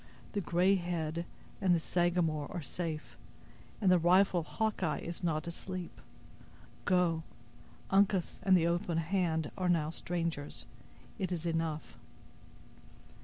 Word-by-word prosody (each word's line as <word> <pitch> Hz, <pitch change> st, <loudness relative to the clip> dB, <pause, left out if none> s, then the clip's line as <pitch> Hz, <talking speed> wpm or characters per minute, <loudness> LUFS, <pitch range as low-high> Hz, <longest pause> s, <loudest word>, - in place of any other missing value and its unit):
The 205 Hz, -, 0 dB
'Gray 180 Hz, +3 st, +3 dB
Head' 170 Hz, -2 st, -2 dB, 0.4 s
and 185 Hz, -3 st, +4 dB
the -, -, +2 dB
Sagamore 170 Hz, -3 st, +1 dB
are 175 Hz, -, -4 dB
safe, 155 Hz, +1 st, -4 dB, 0.6 s
and 195 Hz, -4 st, +4 dB
the 180 Hz, -, +6 dB
rifle 180 Hz, +2 st, +5 dB
of 165 Hz, -, -6 dB
Hawkeye 210 Hz, -8 st, 0 dB
is 170 Hz, +2 st, -6 dB
not 155 Hz, -3 st, 0 dB
asleep. 180 Hz, +1 st, -6 dB, 0.8 s
Go—Uncas 175 Hz, -, 0 dB
and 190 Hz, -1 st, +5 dB
the 165 Hz, -, +2 dB
'Open 170 Hz, 0 st, 0 dB
Hand' 165 Hz, -2 st, 0 dB
are 180 Hz, -1 st, +1 dB
now 160 Hz, -3 st, +2 dB
strangers. 165 Hz, -4 st, -3 dB, 0.5 s
It 185 Hz, -2 st, -1 dB
is 175 Hz, -2 st, -2 dB
enough." 165 Hz, -2 st, -2 dB
170 Hz, 120 wpm, -33 LUFS, 160-180 Hz, 0.8 s, the